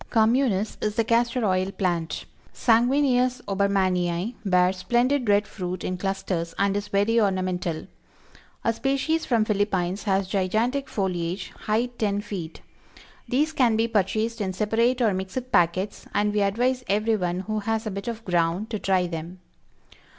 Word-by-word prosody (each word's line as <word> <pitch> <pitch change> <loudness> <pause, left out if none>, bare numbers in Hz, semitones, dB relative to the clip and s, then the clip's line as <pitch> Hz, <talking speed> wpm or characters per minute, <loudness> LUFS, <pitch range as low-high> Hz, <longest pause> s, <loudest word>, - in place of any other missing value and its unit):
Communis 225 -2 +2
is 210 -1 -1
the 230 - +2
Castor 235 +1 +1
Oil 185 -1 +1
Plant. 175 -5 -2 0.3
Sanguineus 250 +1 +3
(Obermanii) 190 -1 0
bears 180 -1 +3
splendid 245 +4 +1
red 205 +1 +4
fruit 180 -2 -5
in 185 - -2
clusters, 180 -3 -3
and 200 0 +1
is 205 0 -2
very 205 +3 +2
ornamental. 185 -4 -1 0.8
A 230 - +2
species 275 +6 0
from 230 -4 +2
Phillippines 200 -2 0
has 195 -2 +1
gigantic 220 +8 0
foliage; 180 -2 -2
height 240 +3 -2
ten 205 -2 +1
feet. 195 -6 -6 0.7
These 300 +5 +1
can 245 -6 +3
be 225 +1 +2
purchased 220 +2 0
in 190 -2 -1
separate 230 +6 +1
or 215 -3 +3
mixed 190 +7 -4
packets, 175 +4 +1
and 205 0 +2
we 210 - +1
advise 245 +6 +1
everyone 200 -4 0
who 215 +2 -2
has 220 +2 -2
a 215 - -2
bit 200 +2 -6
of 230 -1 -5
ground 175 +4 0
to 215 - -2
try 190 -2 +2
them. 170 +1 -6
205 Hz, 150 wpm, -25 LUFS, 185-230 Hz, 0.8 s, red